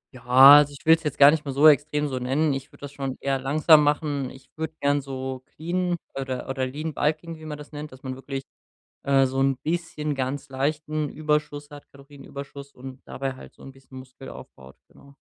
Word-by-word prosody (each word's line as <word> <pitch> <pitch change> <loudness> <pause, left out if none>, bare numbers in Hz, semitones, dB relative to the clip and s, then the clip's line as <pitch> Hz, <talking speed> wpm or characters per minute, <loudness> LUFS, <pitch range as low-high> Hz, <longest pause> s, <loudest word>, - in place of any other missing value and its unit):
Ja, 130 - -12 0.4
also 145 -1 0
ich - - -23
will's 165 +1 +5
jetzt 150 -4 -4
gar 140 0 +8
nicht 160 -1 -1
mehr 140 -2 -5
so 145 +3 +6
extrem 150 0 +3
so 130 -2 -4
nennen, 140 +4 0
ich 135 -1 -5
würde - - -20
das 145 -1 -8
schon 135 -2 -5
eher 135 -1 -1
langsam 150 +4 +4
machen. 145 -2 -1
Ich 130 0 -15
würde 160 0 -5
gern 145 0 +1
so 130 -1 -6
clean 175 +2 -2 0.2
oder 130 -2 -5
oder 135 -1 -2
Lean-Bulking, 155 +3 -3
wie 155 - -11
man 150 -1 -6
das 150 0 -12
nennt 150 0 -8
dass 130 +1 -15
man 130 - -4
wirklich, 135 +1 -6 0.6
äh, 135 -1 +3
so 135 +1 -2
'n 135 -1 +2
bisschen 155 -1 -3
ganz 135 +2 -4
leichten 150 +3 -2
Überschuss 150 -1 -2
hat- 145 0 -13
Kalorienüberschuss- 140 0 -11
und 130 +1 -10
dabei 135 0 -4
halt 130 - -14
so - - -18
'n 135 - -10
bisschen 135 0 -14
Muskel 130 +1 -12
aufbaut, 65 +1 -13
genau. 140 0 -20
140 Hz, 205 wpm, -24 LUFS, 135-150 Hz, 0.6 s, gar